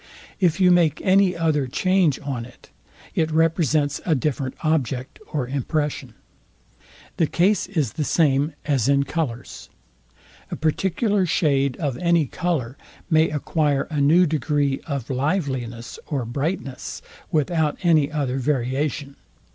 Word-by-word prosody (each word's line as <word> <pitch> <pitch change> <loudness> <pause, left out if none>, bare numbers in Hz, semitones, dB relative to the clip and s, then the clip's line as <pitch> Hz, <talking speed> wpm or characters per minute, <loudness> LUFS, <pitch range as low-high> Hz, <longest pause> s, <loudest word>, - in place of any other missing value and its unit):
If 180 -2 +2
you 180 -1 +5
make 165 -4 +3
any 190 -2 +3
other 155 -5 +1
change 185 +1 +2
on 135 -4 -3
it, 120 +1 -16 0.4
it 160 -1 +1
represents 155 -2 +1
a 160 - +2
different 135 -1 -2
object 135 -5 -1
or 140 -5 -2
impression. 140 -2 -2 1.0
The 165 - +2
case 185 +5 +2
is 155 - -1
the 155 - -2
same 145 -1 +2
as 135 -4 +1
in 140 0 +4
colours. 135 -5 -4 0.8
A - - -4
particular 190 +5 0
shade 140 -5 +1
of 140 -6 -2
any 170 -3 +3
colour 140 -4 -2 0.3
may 160 0 +4
acquire 150 -1 0
a 150 -2 0
new 165 +6 +5
degree 145 -3 0
of 140 -5 -3
liveliness 130 -5 -2
or 135 -5 -2
brightness 135 +2 -4 0.3
without 155 0 +1
any 155 -4 +3
other 135 -4 -1
variation. 140 +2 -2
150 Hz, 130 wpm, -23 LUFS, 135-165 Hz, 1.0 s, you